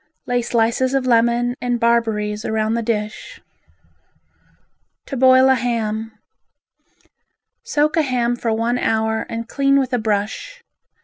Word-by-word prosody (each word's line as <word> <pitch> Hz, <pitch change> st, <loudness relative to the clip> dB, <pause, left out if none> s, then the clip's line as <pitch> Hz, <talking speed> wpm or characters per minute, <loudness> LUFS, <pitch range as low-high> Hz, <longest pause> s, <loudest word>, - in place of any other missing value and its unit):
Lay 245 Hz, -1 st, 0 dB
slices 235 Hz, +3 st, 0 dB
of 270 Hz, -1 st, 0 dB
lemon 240 Hz, 0 st, +2 dB
and 245 Hz, -1 st, -1 dB
barberries 220 Hz, -3 st, 0 dB
round 220 Hz, 0 st, -1 dB
the 235 Hz, -, -1 dB
dish. 215 Hz, -2 st, -4 dB, 1.7 s
To 275 Hz, -, -6 dB
Boil 260 Hz, 0 st, +5 dB
a 265 Hz, -, +5 dB
Ham 225 Hz, -3 st, -2 dB, 1.5 s
Soak 305 Hz, +2 st, 0 dB
a -, -, +5 dB
ham 245 Hz, -4 st, 0 dB
for 235 Hz, -1 st, -2 dB
one 230 Hz, +2 st, 0 dB
hour 220 Hz, 0 st, 0 dB
and 230 Hz, 0 st, -5 dB
clean 275 Hz, +1 st, +2 dB
with 260 Hz, -2 st, -2 dB
a 245 Hz, -, +1 dB
brush. 220 Hz, -, -3 dB
235 Hz, 130 wpm, -20 LUFS, 220-255 Hz, 1.7 s, Boil